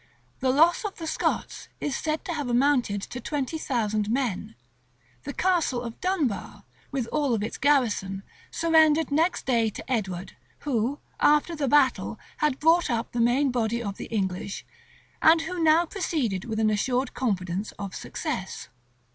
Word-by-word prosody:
The 260 - +1
loss 325 - +4
of 415 -2 -4
the 330 - -7
Scots 320 - -2
is 290 - -2
said 310 0 -2
to 345 - -2
have 290 -5 -3
amounted 245 -5 +2
to 250 - -6
twenty 290 +3 -3
thousand 215 -7 -1
men: 240 - -1 0.7
the - - -3
Castle 345 -9 +1
of 230 -1 -8
Dunbar, 340 - -1 0.3
with 265 -4 -2
all 285 -5 +1
its 220 - -5
garrison, 220 -9 +1 0.3
surrendered 320 -2 +3
next 325 +5 +1
day 230 -4 +2
to - - -9
Edward, 195 -6 -2 0.3
who, 260 0 0 0.2
after 300 +3 +3
the 290 -3 -1
battle, 280 -1 +3 0.2
had 300 -3 +1
brought 330 +2 +4
up 230 -2 -1
the 235 - -1
main 255 +4 +3
body 235 -1 -1
of 200 -2 -4
the - - -6
English, 195 -2 -3 0.6
and 320 +1 +6
who 345 +2 -4
now 320 +2 +5
proceeded 290 - -2
with 220 -2 -3
an 215 -1 +3
assured 250 +5 0
confidence 195 -4 -2
of 195 -3 -7
success. - - -5
260 Hz, 155 wpm, -26 LUFS, 220-310 Hz, 0.7 s, and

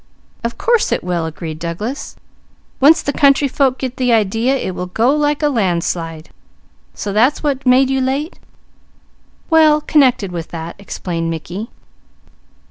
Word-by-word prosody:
"Of 235 0 -3
course 475 -2 +1
it - - 0
will," 175 -2 -2
agreed 160 -1 -7
Douglas. 190 - -5 0.6
"Once 310 +4 +5
the 285 - -2
country 280 0 +4
folk 265 -1 +1
get 260 -1 -5
the 250 -2 +1
idea 225 +4 +2
it 190 - -4
will 180 0 -5
go 235 +9 +2
like 295 0 0
a - - +4
landslide. 170 - -2 0.6
So 200 - -4
that's 245 +10 +2
what 275 -3 -1
made 260 +1 +4
you 265 0 +1
late?" 275 +6 -2 1.1
"Well 310 -2 +5
connected 260 - +2
with 170 -2 -5
that," 165 0 -7
explained 170 -4 -4
Mickey. 175 +7 -5
240 Hz, 145 wpm, -17 LUFS, 175-280 Hz, 1.1 s, Once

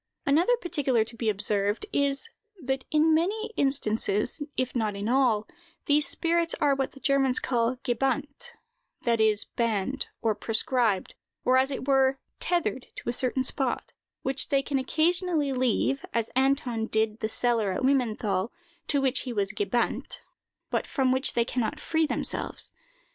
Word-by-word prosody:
Another 335 +12 +3
particular 290 - +1
to 230 +2 -7
be 225 -1 -1
observed 205 - 0
is, 280 +6 +2 0.3
that 265 -3 -3
in 315 +1 +3
many 420 +8 0
instances, 230 -2 +2 0.2
if 255 0 -1
not 215 -4 0
in 200 +1 -4
all, 240 -4 +2 0.4
these 295 +1 +3
spirits 335 0 0
are 290 -2 +3
what 270 -1 -2
the 275 - -13
Germans 270 -2 +2
call 240 0 0
gebannt, 280 - -2 0.5
that 230 -2 +2
is, 215 -1 +2
banned, 230 +2 -2
or 225 -2 +1
proscribed, 225 -1 0 0.3
or, 255 - +4
as 260 +1 +3
it 270 -1 -5
were, 270 -1 +3 0.2
tethered 265 - -1
to - - -5
a - - 0
certain 255 +1 +1
spot, 260 -1 -1 0.3
which 265 0 0
they 275 -1 +2
can 275 -1 -1
occasionally 315 +1 +1
leave, 255 +2 +1
as 230 -1 0
Anton 260 -4 +1
did 220 0 0
the 220 - -2
cellar 230 -3 +1
at 185 - -3
Wimmenthal, 225 -7 +1 0.4
to 285 -2 +2
which 265 -1 +2
he 255 - -4
was 200 -3 -1
gebannt, 455 +4 -1 0.5
but - - -1
from 265 -3 +1
which 260 +2 +2
they 235 -1 +2
can 250 0 -2
not 265 +7 -2
free 320 0 0
themselves. - - -2
260 Hz, 160 wpm, -27 LUFS, 225-285 Hz, 0.5 s, or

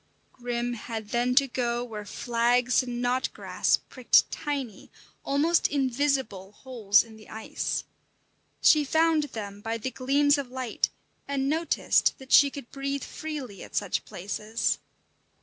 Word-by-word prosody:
Grim 240 0 -3
had 220 -2 -6
then 245 +2 +1
to 275 +1 +5
go 240 -1 -1
where 215 -4 -7
flags 240 +4 +2
and 245 -1 -4
knotgrass 250 +1 +1
pricked 255 -2 +3
tiny, 275 -8 -4 0.3
almost 310 +5 +2
invisible 265 -7 -1
holes 215 -5 +2
in 225 -1 -14
the 215 - -16
ice. 220 0 -3 0.8
She 305 -1 +6
found 315 +1 +2
them 205 -6 -7
by 225 +1 -2
the 245 +4 -4
gleams 285 +3 +2
of 270 -3 -5
light, 255 -2 -1 0.4
and 275 -1 -1
noticed 320 +3 +2
that 265 -1 -13
she 285 - +7
could 275 -3 -10
breathe 275 0 -3
freely 280 - -6
at - - -12
such 200 -3 -1
places. 210 +4 -2
250 Hz, 135 wpm, -27 LUFS, 225-280 Hz, 0.8 s, she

